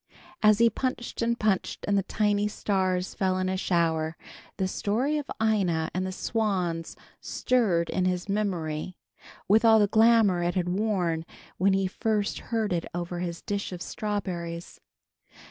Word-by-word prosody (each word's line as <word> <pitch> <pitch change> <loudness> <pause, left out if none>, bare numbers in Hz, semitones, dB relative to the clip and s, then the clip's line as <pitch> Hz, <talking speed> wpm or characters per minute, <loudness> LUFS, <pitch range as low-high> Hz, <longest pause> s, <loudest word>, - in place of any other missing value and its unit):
As 215 -1 +6
he 235 +1 +5
punched 245 0 -3
and 235 0 0
punched 210 -3 0
and 200 - +2
the 200 - +3
tiny 205 +1 +1
stars 190 -3 -1
fell 185 -1 0
in 185 0 0
a 190 - 0
shower, 165 -3 0 0.4
the 190 - 0
story 250 +11 0
of 290 - -8
Ina 190 -8 +1
and 185 +1 -1
the - - -3
swans 185 -6 -1 0.2
stirred 200 -10 +1
in 185 - 0
his 180 0 -1
memory, 185 -5 -2 0.5
with 215 +4 +5
all 225 -1 +7
the 210 - +5
glamour 220 -3 +4
it 175 +1 -1
had 180 -1 0
worn 180 -5 0 0.4
when 195 +2 +4
he 195 0 +2
first 210 +2 -1
heard 220 -4 -1
it 170 -1 -2
over 175 0 -3
his 170 -1 -4
dish 200 -1 -3
of 180 - -6
strawberries. 175 -5 -4
190 Hz, 160 wpm, -27 LUFS, 175-215 Hz, 0.5 s, all